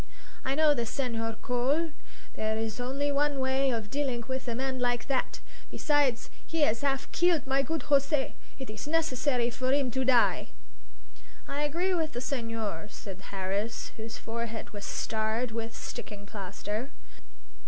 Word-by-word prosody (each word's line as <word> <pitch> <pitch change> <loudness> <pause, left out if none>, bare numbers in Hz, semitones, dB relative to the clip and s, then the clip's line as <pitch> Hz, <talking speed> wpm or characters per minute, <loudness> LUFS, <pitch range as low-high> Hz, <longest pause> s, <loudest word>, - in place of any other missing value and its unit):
"I 265 +1 +1
know 310 0 +6
this 235 -5 -1
Senhor 225 -4 -1
Cole. 275 +7 +2 0.4
There 220 0 0
is 220 0 -2
only 275 +4 0
one 285 0 +2
way 265 +1 +3
of 225 -4 -2
dilling 270 -4 0
with 260 0 -3
a 235 - -1
man 260 +1 -1
like 245 -1 +1
that. 270 -2 0 0.3
Besides, 290 -6 +2
he 325 -2 +1
'as 230 -1 +2
'alf 270 -1 +1
keeled 345 -5 +4
my 270 +1 +3
good 320 +4 -1
José; 280 0 +3 0.2
it 265 -6 -6
is 215 +5 -6
necessary 285 -6 +2
for 255 +2 0
'im 275 -2 +3
to 260 +2 +1
die." 250 -2 +4 1.0
"I 280 +1 -2
agree 340 +6 +1
with 320 -3 0
the 240 - -2
senhor," 230 - -2
said 195 -2 -8
Harris, 195 +3 -2
whose 225 0 -6
forehead 230 0 -4
was 205 -1 -6
starred 220 +2 0
with 225 0 -4
sticking 205 -1 -6
plaster. 210 +4 -4
255 Hz, 155 wpm, -30 LUFS, 225-280 Hz, 1.0 s, know